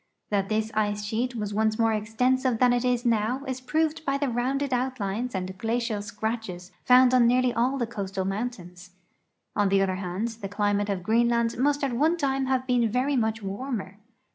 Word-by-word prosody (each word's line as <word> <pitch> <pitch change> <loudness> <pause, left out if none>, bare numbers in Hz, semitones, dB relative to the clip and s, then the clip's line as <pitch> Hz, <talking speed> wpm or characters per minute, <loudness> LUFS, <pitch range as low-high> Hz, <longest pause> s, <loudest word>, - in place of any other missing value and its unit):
That 195 -1 0
this 220 0 0
ice 210 -1 0
sheet 240 +4 -2
was 210 -2 -3
once 220 +1 +1
more 225 -1 +2
extensive 250 +4 +1
than 245 +1 +4
it 245 0 +1
is 250 -1 0
now 235 +3 +1
is 260 -1 -4
proved 315 +4 0
b}^ 275 -2 0
the 285 -2 0
rounded 260 +3 -1
outlines 245 -2 -2
and 185 0 -4
glacial 230 -1 -1
scratches 210 -3 -5
found 255 0 +6
on 245 -2 +5
nearly 250 0 +3
all 250 +4 +1
the 240 - 0
coast 200 -4 -6
mountains. 185 -3 -4 0.6
On 205 -1 +2
the 195 0 +3
other 185 -1 -1
hand, 190 +4 -3
the 225 -3 -7
climate 205 0 0
of 190 -3 -2
Greenland 235 +2 +2
must 285 +2 +1
at 270 -3 0
one 310 +8 +2
time 270 -3 0
have 260 -1 0
been 245 -3 +2
very 255 +5 0
much 220 -2 0
warmer. 200 -1 -5
230 Hz, 190 wpm, -26 LUFS, 205-255 Hz, 0.6 s, found